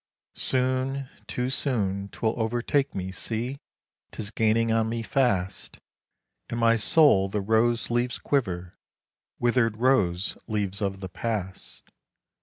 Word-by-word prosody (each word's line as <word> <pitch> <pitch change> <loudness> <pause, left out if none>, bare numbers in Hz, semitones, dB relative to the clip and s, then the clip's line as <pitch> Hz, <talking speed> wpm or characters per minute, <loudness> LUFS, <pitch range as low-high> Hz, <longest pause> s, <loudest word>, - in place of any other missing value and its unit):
Soon, 130 +1 +1 0.2
too 125 +1 -2
soon, 100 -8 0
'twill 110 +2 -1
overtake 120 +5 0
me, 95 0 -3
see! 120 +7 -4 0.5
'tis 105 -1 -6
gaining 115 0 +2
on 110 0 +1
me 115 0 -3
fast 100 -8 -1 0.7
In 115 - -3
my 115 0 +4
soul 110 -4 +5
the 105 - -2
rose 115 +3 +1
leaves 120 0 0
quiver 90 -10 -2 0.6
withered 120 -2 +1
rose 105 -7 +2
leaves 100 -2 -2
of 95 -1 -2
the 95 - -6
past. 95 -2 -5
115 Hz, 120 wpm, -26 LUFS, 100-125 Hz, 0.7 s, soul